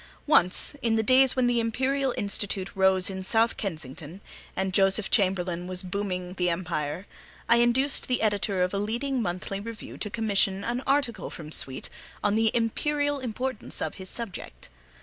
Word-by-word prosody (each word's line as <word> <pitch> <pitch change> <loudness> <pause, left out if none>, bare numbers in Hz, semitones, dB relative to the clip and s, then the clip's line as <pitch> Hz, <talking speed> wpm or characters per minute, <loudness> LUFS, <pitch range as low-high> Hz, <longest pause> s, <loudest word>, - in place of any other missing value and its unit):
Once, 205 - +3
in 230 -3 +2
the 220 - +1
days 260 +2 +5
when 255 -1 +2
the 245 -1 +2
Imperial 260 +4 0
Institute 200 -1 -2
rose 190 -1 +3
in 190 -1 -3
South 225 +4 +2
Kensington, 160 -2 -6 0.4
and 190 0 -1
Joseph 195 +1 +4
Chamberlain 180 -4 +1
was 185 0 -2
booming 185 -1 -3
the 180 -1 0
Empire, 170 0 -3 0.4
I 235 - +5
induced 250 +4 +3
the 250 -3 0
editor 200 -3 +1
of 180 - -1
a 200 - 0
leading 240 +5 -1
monthly 190 0 -3
review 225 +1 -8
to 210 - -2
commission 200 -3 0
an 240 +3 -2
article 275 -3 0
from 155 -3 -9
Sweet 130 -4 +1 0.3
on 205 - +3
the 225 0 +3
imperial 290 +5 0
importance 255 0 -3
of - - -3
his 185 - -6
subject. 230 -6 -7
205 Hz, 165 wpm, -27 LUFS, 185-240 Hz, 0.4 s, days